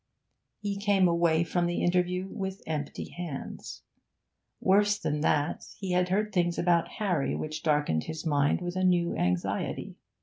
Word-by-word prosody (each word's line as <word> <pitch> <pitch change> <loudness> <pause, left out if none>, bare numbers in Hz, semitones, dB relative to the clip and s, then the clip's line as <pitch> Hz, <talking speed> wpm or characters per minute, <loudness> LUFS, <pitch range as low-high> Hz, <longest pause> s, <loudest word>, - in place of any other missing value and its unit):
He 205 -1 -3
came 200 -2 +3
away 170 -1 +3
from 175 +1 0
the 175 - -1
interview 180 +1 +1
with 190 -1 -5
empty 150 -2 -4
hands. 170 -6 -7 0.8
Worse 205 +2 +4
than 150 -7 -2
that, 150 0 +1
he 190 -3 -4
had 180 0 +2
heard 210 +2 0
things 175 -2 +1
about 170 -1 +2
Harry 180 -10 0
which 155 +1 -4
darkened 145 - +1
his 160 +1 -6
mind 145 0 +2
with 175 0 -4
a 185 - 0
new 175 -2 +2
anxiety. 90 0 -1
175 Hz, 155 wpm, -29 LUFS, 160-190 Hz, 0.8 s, Worse